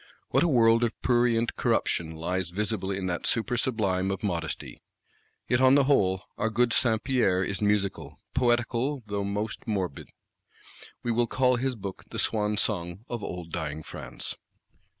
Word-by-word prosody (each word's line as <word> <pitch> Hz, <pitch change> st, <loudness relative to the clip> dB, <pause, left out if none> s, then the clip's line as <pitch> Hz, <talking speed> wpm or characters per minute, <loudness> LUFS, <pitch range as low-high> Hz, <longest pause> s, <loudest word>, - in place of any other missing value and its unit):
What -, -, +3 dB
a -, -, +4 dB
world 115 Hz, -5 st, +5 dB
of 115 Hz, -, -1 dB
prurient 120 Hz, -2 st, +2 dB
corruption 80 Hz, -1 st, 0 dB
lies 90 Hz, +2 st, -2 dB
visible 100 Hz, +1 st, -1 dB
in 95 Hz, -1 st, -2 dB
that 90 Hz, -2 st, -2 dB
super 120 Hz, +2 st, +1 dB
sublime 100 Hz, -7 st, 0 dB
of 95 Hz, 0 st, -3 dB
modesty! 85 Hz, -6 st, -3 dB, 0.7 s
Yet, 125 Hz, 0 st, +2 dB
on 130 Hz, +1 st, +7 dB
the 140 Hz, -, +5 dB
whole, 95 Hz, -9 st, +2 dB, 0.2 s
our 110 Hz, -, +1 dB
good 120 Hz, +1 st, +2 dB
Saint 110 Hz, -3 st, +2 dB
Pierre 100 Hz, -9 st, +2 dB
is 95 Hz, +2 st, -2 dB
musical, 95 Hz, -8 st, 0 dB
poetical 120 Hz, +2 st, +1 dB
though 100 Hz, -1 st, -2 dB
most 105 Hz, +4 st, -3 dB
morbid: 95 Hz, -9 st, -3 dB, 0.9 s
we 120 Hz, -, 0 dB
will 120 Hz, +1 st, +2 dB
call 125 Hz, +1 st, +2 dB
his 130 Hz, +1 st, -1 dB
Book 100 Hz, -3 st, -7 dB
the -, -, -6 dB
swan 105 Hz, -1 st, +1 dB
song 90 Hz, 0 st, -1 dB
of 120 Hz, -4 st, -4 dB
old 90 Hz, -3 st, -6 dB
dying 80 Hz, -2 st, -4 dB
France. -, -, -7 dB
105 Hz, 160 wpm, -27 LUFS, 95-120 Hz, 0.9 s, on